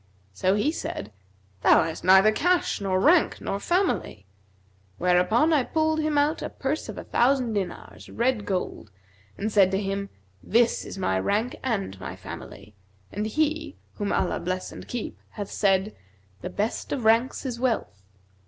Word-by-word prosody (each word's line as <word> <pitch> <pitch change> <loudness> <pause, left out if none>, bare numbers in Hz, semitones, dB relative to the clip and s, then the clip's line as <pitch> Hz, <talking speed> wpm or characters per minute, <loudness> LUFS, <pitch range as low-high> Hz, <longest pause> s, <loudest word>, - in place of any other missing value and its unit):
So 185 - +1
he 210 +9 +1
said, 110 - -5 0.5
'Thou - - +6
hast 160 0 -5
neither 190 +3 +7
cash 350 - +1
nor 190 -2 +1
rank 320 - +4
nor 200 - -3
family;' 345 - -1 0.7
whereupon 180 - +3
I 295 - +4
pulled 315 +3 0
him 305 -1 0
out 295 +2 +2
a - - -3
purse 280 +3 -3
of - - -7
a - - -6
thousand 250 -2 +2
dinars, 195 -3 -5
red 240 -2 0
gold, 185 - -3 0.5
and 215 +2 -2
said 195 -3 +5
to 190 0 0
him, 200 0 -3 0.3
'This 235 +2 +2
is - - -8
my 95 - 0
rank[FN#235] 215 - -1
and 200 - -2
my - - -6
family; 105 - -10 0.4
and 210 +2 -2
he 310 +4 -1 0.2
(whom 205 -2 -2
Allah 185 - 0
bless 185 +1 -3
and - - -10
keep!) 240 -2 -5
hath 205 -2 -7
said, 195 0 +1 0.5
The - - -4
best 210 +3 -3
of 255 -5 -2
ranks 230 +5 +3
is 245 -3 -3
wealth. 220 - -1
215 Hz, 160 wpm, -26 LUFS, 190-270 Hz, 0.7 s, neither